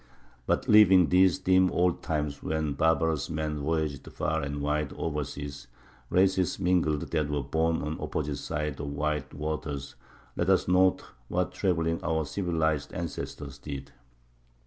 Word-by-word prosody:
But - - +1
leaving 95 -5 +7
these 90 0 +5
dim 95 0 +3
old 90 -1 +1
times 75 -3 -2
when 80 -2 -1
barbarous 80 0 +1
men 80 -1 -2
voyaged 75 -2 -2
far 80 0 -1
and 70 0 -4
wide 75 0 -1
over 75 -2 -2
seas, 70 -2 -7 0.4
and - - -1
races 95 -1 +2
mingled 90 -5 +2
that 75 -3 0
were 75 -1 -1
born 80 +4 0
on 75 +1 -3
opposite 75 -1 -2
sides 75 -2 -3
of 75 - -4
wide 75 +1 -2
waters, 75 -2 -4 0.4
let 85 - 0
us 95 - +3
note 90 +1 +3 0.2
what - - -1
traveling 85 -3 0
our 80 -2 0
civilized 80 -4 -1
ancestors 75 -4 -5
did. 70 -2 -7
80 Hz, 145 wpm, -28 LUFS, 75-85 Hz, 0.4 s, leaving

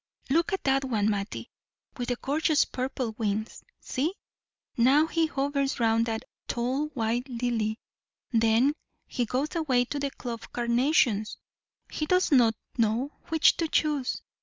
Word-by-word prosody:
Look 335 +6 +2
at 385 - -2
that 270 0 +2
one, 215 -5 +1
Mattie, 200 0 -4 0.4
with 245 -2 -4
the 245 - +1
gorgeous 300 +4 +2
purple 255 -2 -3
wings; 215 0 -2 0.2
see, 310 +9 -2 0.6
now 275 +5 +5
he 325 0 +1
hovers 275 -2 -1
round 230 0 +2
that 225 -1 -2 0.2
tall, 255 +5 -1
white 240 +2 -1
lily, 230 -3 -1 0.5
then 230 +4 +3 0.3
he 245 - -2
goes 265 +8 -2
away 260 -7 +2
to 285 +4 -4
the 280 0 -1
clove 240 -4 -7
carnations; 235 -3 +2 0.5
he 305 - -2
does 365 0 +2
not 235 -5 +5 0.2
know 230 +5 +1 0.2
which 320 -1 +4
to 330 - 0
choose. 300 -4 0
255 Hz, 140 wpm, -27 LUFS, 230-290 Hz, 0.6 s, now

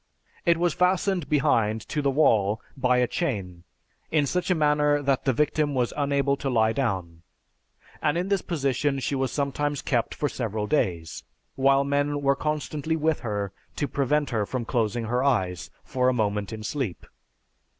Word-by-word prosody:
It 170 -1 +5
was 175 0 +1
fastened 180 -3 +1
behind 115 -7 +2
to 150 - -1
the 140 - +2
wall 110 -8 +3 0.2
by 125 -2 +2
a 125 - +4
chain, 95 - -3 0.4
in 155 -2 +2
such 180 +7 -1
a 185 - +3
manner 150 -1 +3
that 140 -2 0
the 135 - +4
victim 150 +2 +1
was 125 -2 0
unable 140 -1 +1
to 135 - -3
lie 110 -3 +3
down, 95 -10 -2 0.8
and 150 - +1
in 180 +2 -1
this 195 -2 +1
position 140 -3 0
she 135 - -2
was 135 -2 0
sometimes 145 0 -1
kept 120 -4 0
for 145 - 0
several 110 -5 -3
days, 85 - -1 0.3
while 135 +1 +4
men 145 +1 0
were 140 0 +3
constantly 150 +1 -2
with 160 0 +1
her 105 -4 -3 0.2
to 145 - -1
prevent 145 +1 0
her 110 -3 0
from 125 -3 -3
closing 115 -1 0
her 125 +3 0
eyes 95 -10 0
for 125 0 +1
a - - +2
moment 105 -4 -1
in 110 -1 -6
sleep. 115 -5 -3
135 Hz, 170 wpm, -26 LUFS, 115-150 Hz, 0.8 s, It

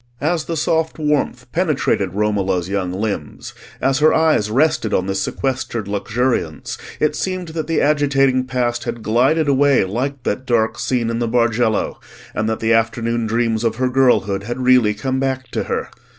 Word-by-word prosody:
As 155 +2 0
the 165 - -3
soft 160 +1 0
warmth 145 -5 -1
penetrated 150 - 0
Romola's 100 -4 0
young 95 -2 -2
limbs, 95 -5 -4 0.3
as 135 +1 +1
her 155 +1 +5
eyes 155 -10 +2
rested 130 -2 +1
on 90 - 0
this 95 0 -1
sequestered 130 -5 -2
luxuriance, 105 -3 -2 0.2
it 150 -1 +1
seemed 185 0 -3
that 160 -1 -4
the 165 - +1
agitating 135 -3 +2
past 120 -2 -1
had 120 -2 -5
glided 135 +8 +2
away 140 -2 +4
like 125 +7 -3
that 130 +6 -2
dark 115 -2 +1
scene 120 -3 0
in 115 - -2
the 120 - 0
Bargello, 115 -1 +1 0.3
and 110 +1 -1
that 110 - -2
the 115 +1 +2
afternoon 115 0 0
dreams 115 0 0
of 115 -1 0
her 130 +2 0
girlhood 125 -7 +2
had 120 +4 -5
really 125 -5 +4
come 130 +5 -2
back 130 -1 -2
to - - -2
her. - - -3
120 Hz, 170 wpm, -19 LUFS, 110-140 Hz, 0.3 s, her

